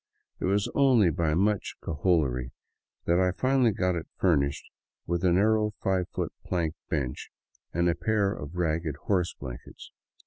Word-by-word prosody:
It - - -2
was 100 +2 +1
only 125 -10 +4
by 75 0 0
much 100 +3 +1
cajolery 70 -6 0 0.5
that 85 +1 +3
I 90 0 +3
finally 130 -2 +3
got 90 -3 0
it 85 -2 -4
furnished 70 -6 +1 0.4
with 85 +1 -1
a 90 - +4
narrow 105 +3 +2
five 95 -2 0
foot - - -3
plank 85 -3 -1 0.2
bench 65 -3 -3 0.4
and 85 +1 +1
a 85 - +3
pair 105 0 +1
of 75 0 -8
ragged 80 -3 -1
horse 90 -4 +1
blankets. 60 -3 -10
90 Hz, 150 wpm, -28 LUFS, 80-100 Hz, 0.5 s, only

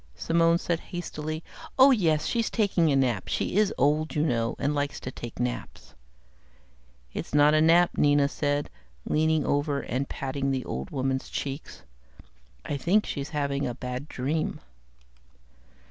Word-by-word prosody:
Simone 165 0 +3
said 170 -1 -1
hastily, 155 -3 -5 0.3
"Oh 270 +1 +8
yes, 160 - +2
she's 230 -2 0
taking 185 -8 +2
a - - +3
nap. 125 -8 +1
She - - -2
is 210 -1 +3
old, 150 +3 +1
you 150 - +2
know, 115 -6 0
and 145 +2 0
likes 145 0 -2
to 130 - -6
take 120 -2 -8
naps." 125 0 -4 1.2
"That's - - -4
not 145 +1 +6
a 155 - +4
nap," 170 +2 +5
Nina 145 -1 +4
said, 145 0 -1 0.3
leaning 155 -1 +1
over 145 0 0
and 130 +3 -3
patting 135 0 -3
the 130 -2 -1
old 65 +1 -4
woman's 130 0 -2
cheek, 140 +1 -4 1.0
"I 145 - -2
think 195 +9 +2
she's 140 0 -4
having 140 -2 -1
a 120 - -4
bad 125 +2 -5
dream." 150 +4 -2
145 Hz, 150 wpm, -27 LUFS, 135-160 Hz, 1.2 s, Oh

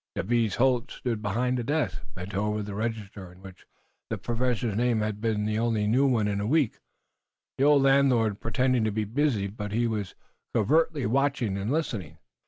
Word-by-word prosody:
Jabez 115 0 +1
Holt 130 0 +2
stood 115 -4 -3
behind 125 +5 0
the - - -2
desk, 115 -7 -1
bent 90 +3 -7
over 105 +2 -1
the 100 0 -6
register, 105 -3 -4
on 90 +2 -17
which 95 -1 -13 0.4
the - - -2
Professor's 120 -2 -1
name 120 -1 +1
had 105 -1 -3
been 110 -2 0
the 110 0 0
only 115 -2 +1
new 130 +6 +3
one 115 -5 +2
in 100 -1 -1
a 105 - -2
week. 145 -2 +1 0.8
The 135 - +4
old 145 -2 +5
landlord 130 -6 +3
pretended 125 +1 +1
to 110 - 0
be 110 +1 -1
busy, 120 -2 0
but 105 +1 -5
he 115 +3 +1
was 105 -4 -3 0.4
covertly 145 +5 +2
watching 135 -3 +1
and 100 +4 -2
listening. 105 - -2
115 Hz, 185 wpm, -27 LUFS, 105-125 Hz, 0.8 s, old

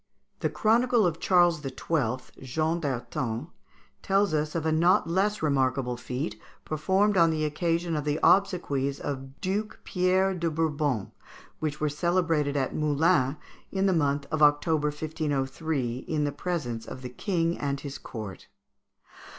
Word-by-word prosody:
The - - 0
chronicler 230 -1 +3
of 165 -1 -2
Charles 175 -4 +4
XII., 130 -2 -3
Jean 155 +6 -1
d'Arton, 130 -1 -3 0.5
tells 195 -1 +2
us 155 +1 -1
of 165 -2 -1
a 160 - +2
not 175 +6 +4
less 195 +3 0
remarkable 130 -3 +1
feat, 125 +4 -4 0.2
performed 190 +6 +1
on 165 -1 +6
the 155 -1 0
occasion 165 +2 0
of 150 - -1
the 150 +1 -1
obsequies 145 -8 +2
of 135 -1 -6
Duke 200 +3 -2
Pierre 185 +1 +2
de 170 -2 -1
Bourbon, 150 -8 -1 0.5
which 150 -1 -2
were 150 - +1
celebrated 160 -2 +1
at 135 -2 -1
Moulins, 150 -2 +2 0.4
in 195 0 0
the 190 - +3
month 145 -3 +1
of 155 -1 -1
October, 150 +1 +4
1503, 145 -3 -2
in 155 -2 0
the 145 - 0
presence 135 -11 -3
of 130 - -8
the 125 - -5
king 170 +5 -1
and 140 -1 -1
the 140 0 -7
court. 105 -6 -8
155 Hz, 145 wpm, -27 LUFS, 140-175 Hz, 0.5 s, on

